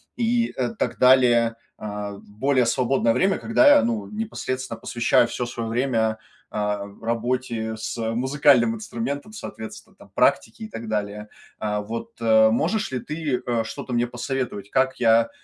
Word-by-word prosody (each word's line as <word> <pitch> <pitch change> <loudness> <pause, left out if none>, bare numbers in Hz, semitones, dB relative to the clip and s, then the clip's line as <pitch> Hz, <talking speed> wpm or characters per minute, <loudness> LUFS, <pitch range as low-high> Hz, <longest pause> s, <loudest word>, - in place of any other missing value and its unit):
и, 235 0 +1
э, 230 - -2
так - - -2
далее. 120 -3 +5 0.2
А, 105 -1 -5
в 100 - -14
более 130 -2 +2
свободное 120 -1 +2
время, 195 +1 +2
когда 290 +7 +3
я, 280 - +3
ну, 235 -2 -1
непосредственно 130 - -4
посвящаю 120 +1 +2
всё 120 +1 -3
свое 115 -1 -4
время, 115 -3 0 0.3
а, 105 -1 -1 0.2
работе 115 -1 -2
с, 110 - -4
э, 110 0 -1
музыкальным 130 -2 +3
инструментом, 130 - -5
соответственно 215 - -9
там - - -17
практике, 225 - +1
и - - -5
так 115 - -8
далее. 105 0 -3 0.3
А, 105 -1 -1
вот, 115 +3 -6
э, 110 -1 +5
можешь 180 - 0
ли 130 - -2
ты, 150 -3 -3
э, 120 -2 0
что-то 125 +2 -6
мне 120 0 +1
посоветовать, 120 -5 -4
как 130 0 +1
я, 115 -1 +4
120 Hz, 160 wpm, -23 LUFS, 110-135 Hz, 0.3 s, далее